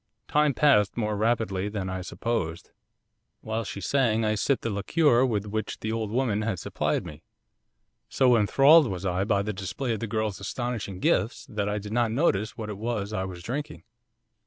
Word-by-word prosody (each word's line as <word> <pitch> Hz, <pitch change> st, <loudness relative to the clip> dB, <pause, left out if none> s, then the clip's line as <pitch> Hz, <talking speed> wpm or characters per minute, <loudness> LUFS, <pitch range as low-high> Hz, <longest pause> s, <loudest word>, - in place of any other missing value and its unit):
'Time 150 Hz, 0 st, +3 dB
passed 130 Hz, -9 st, +3 dB
more 105 Hz, -2 st, 0 dB
rapidly 105 Hz, -3 st, 0 dB
than 100 Hz, -3 st, -4 dB
I 95 Hz, 0 st, -3 dB
supposed. 90 Hz, -3 st, -3 dB, 0.7 s
While 110 Hz, +1 st, -3 dB
she 100 Hz, 0 st, -6 dB
sang 115 Hz, 0 st, +1 dB
I 110 Hz, -, +2 dB
sipped 130 Hz, +5 st, 0 dB
the 115 Hz, -, -1 dB
liquor 120 Hz, +5 st, +3 dB
with 105 Hz, -4 st, -1 dB
which 110 Hz, 0 st, -4 dB
the 110 Hz, -, -3 dB
old 110 Hz, -2 st, -2 dB
woman 115 Hz, -2 st, 0 dB
had 105 Hz, -3 st, -1 dB
supplied -, -, -2 dB
me. -, -, -9 dB, 0.9 s
So 125 Hz, -2 st, +4 dB
enthralled 135 Hz, +8 st, +6 dB
was 95 Hz, -2 st, -4 dB
I 90 Hz, +1 st, 0 dB
by 100 Hz, -2 st, +1 dB
the 105 Hz, +1 st, -3 dB
display 105 Hz, +6 st, -3 dB
of 110 Hz, -, -3 dB
the 115 Hz, -, -3 dB
girl's 110 Hz, -2 st, -2 dB
astonishing 100 Hz, -3 st, -4 dB
gifts 105 Hz, +7 st, +1 dB
that 105 Hz, -2 st, -3 dB
I 105 Hz, -, -1 dB
did 105 Hz, +1 st, -6 dB
not 120 Hz, -1 st, +2 dB
notice 110 Hz, -, 0 dB
what 110 Hz, -1 st, -5 dB
it 100 Hz, -, -7 dB
was 110 Hz, -2 st, -3 dB
I 95 Hz, -2 st, -1 dB
was 90 Hz, -2 st, -8 dB
drinking. 125 Hz, -, -5 dB
110 Hz, 185 wpm, -26 LUFS, 100-120 Hz, 0.9 s, enthralled